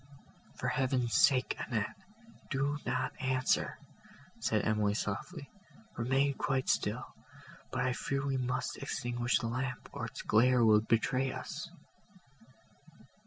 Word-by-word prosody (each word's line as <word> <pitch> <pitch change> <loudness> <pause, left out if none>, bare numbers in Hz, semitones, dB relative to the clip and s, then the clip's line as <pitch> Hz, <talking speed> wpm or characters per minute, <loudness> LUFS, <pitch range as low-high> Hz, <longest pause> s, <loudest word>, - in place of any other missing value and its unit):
"For - - -3
heaven's 130 -3 0
sake, 130 -2 +4
Annette, 110 -4 -2 0.5
do 140 +2 0
not 130 0 0
answer," 130 0 +1 0.6
said - - +1
Emily 105 -1 +2
softly, 140 - -4 0.4
"remain 135 +4 +2
quite 135 -1 -1
still; - - +1 0.6
but 125 -1 -1
I 130 - +1
fear 135 +2 -2
we 135 -1 0
must 125 0 -2
extinguish 120 -2 0
the 115 - -2
lamp, 125 +2 -3
or - - -3
its - - -8
glare 120 +2 +4
will 105 -1 +6
betray 125 +4 +1
us." - - -6
130 Hz, 120 wpm, -32 LUFS, 115-135 Hz, 0.6 s, will